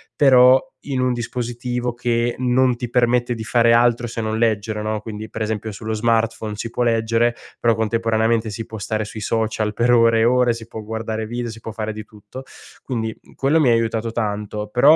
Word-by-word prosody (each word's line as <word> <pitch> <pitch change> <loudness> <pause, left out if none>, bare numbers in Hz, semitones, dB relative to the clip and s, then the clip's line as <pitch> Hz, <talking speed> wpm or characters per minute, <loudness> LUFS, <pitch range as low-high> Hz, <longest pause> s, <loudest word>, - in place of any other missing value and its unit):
però 130 -2 +6 0.2
in 135 -3 -2
un 125 0 +2
dispositivo 120 0 -3
che 120 0 0
non 125 -1 +2
ti 120 -2 -5
permette 120 0 +2
di 110 -1 -6
fare 115 +1 +3
altro 120 0 +3
se 115 0 -4
non 110 0 -2
leggere, 110 -1 0
no, 110 0 -2
quindi, 110 0 -7
per - - -7
esempio, 110 0 -2
sullo 110 +2 -5
smartphone 110 -1 0
si 115 +2 -5
può 120 - -1
leggere, 115 +1 +1 0.2
però 115 -1 +3
contemporaneamente 115 0 +1
si 110 +2 -5
può 110 - -8
stare 110 +1 -2
sui 110 +1 -8
social 110 -1 -1
per 120 +2 +2
ore 115 -1 +5
e - - +3
ore, 125 0 +3
si 115 -1 -9
può 110 - -7
guardare 110 0 -4
video, 120 +1 -4
si 115 - -10
può 115 - -7
fare 110 -1 -3
di 105 0 -8
tutto. 105 +5 -11 0.4
Quindi, 110 -4 -3
mhmm, - - -21
quello 145 +4 +2
mi 135 -5 +4
ha - - +5
aiutato 115 0 0
tanto, 105 -1 -3
però 145 +6 +6
115 Hz, 205 wpm, -21 LUFS, 110-120 Hz, 0.4 s, però